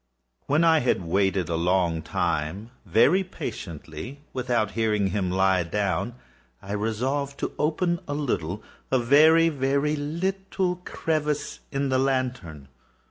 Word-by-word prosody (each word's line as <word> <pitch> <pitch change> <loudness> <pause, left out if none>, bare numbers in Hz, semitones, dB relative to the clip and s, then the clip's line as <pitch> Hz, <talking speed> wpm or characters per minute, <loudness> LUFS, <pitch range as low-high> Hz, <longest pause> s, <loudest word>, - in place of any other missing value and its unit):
When 150 +4 +3
I 165 -1 +5
had 125 -8 +1
waited 95 +1 +1
a 85 - -1
long 85 -1 +1
time, 90 +10 -2 0.2
very 120 - +4
patiently, 110 - -7
without 120 -5 0
hearing 110 -3 +1
him 95 -2 -1
lie 95 0 +3
down, 100 +6 -1 0.4
I 100 - -9
resolved 130 +7 -1
to - - -2
open 170 +3 +1
a 145 - -2
little—a 105 - -3
very, 155 +7 +6
very 140 +1 0
little 185 +4 -2
crevice 150 -2 -2
in 140 0 -1
the 130 0 +2
lantern. 125 - -2
125 Hz, 125 wpm, -25 LUFS, 95-150 Hz, 0.4 s, very